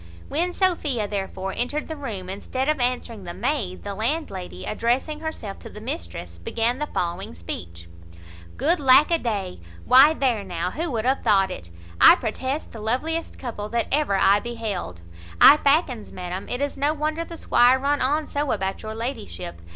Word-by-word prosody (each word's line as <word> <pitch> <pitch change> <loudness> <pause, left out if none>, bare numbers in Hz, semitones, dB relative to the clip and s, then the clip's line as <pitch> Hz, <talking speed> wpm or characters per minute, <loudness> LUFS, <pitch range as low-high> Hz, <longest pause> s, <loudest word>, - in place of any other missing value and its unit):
When 345 +4 0
Sophia 310 - +1
therefore 195 -1 -4
entered 290 +5 -1
the 315 - -5
room, 220 -11 -5
instead 255 +8 -3
of 305 -2 +1
answering 245 -4 -1
the 175 -1 -7
maid, 215 -12 -2
the 200 - -4
landlady, 220 - -3
addressing 250 +8 -1
herself 310 -11 -6
to - - -10
the 210 - -10
mistress, 85 - -6
began 230 - -1
the 300 - -2
following 175 - -3
speech: 85 0 -8 0.7
"Good 335 +5 +2
lack 275 +3 +6
a 335 - +3
day! 200 - -3 0.3
why 270 +5 +7
there 245 -8 +1
now, 180 -1 -3
who 330 - -3
would 230 -4 -2
have 265 +2 +2
thought 195 -2 +3
it? 85 - -8 0.3
I - - +10
protest 260 +6 -3
the 225 - -9
loveliest 305 +10 -2
couple 215 -4 -5
that 235 +1 -1
ever 290 -8 +2
eye 195 +1 +5
beheld. 210 - -5 0.4
I 295 - +10
fackins, 275 -7 +1
madam, 180 +1 -6
it 245 - -2
is 285 0 -1
no 290 +3 +1
wonder 310 +2 -1
the 335 0 -9
squire 250 -2 +4
run 285 +2 0
on 295 +4 +1
so 290 -1 -2
about 195 -2 -2
your 220 0 -6
ladyship. 90 - -5
235 Hz, 175 wpm, -24 LUFS, 195-290 Hz, 0.7 s, I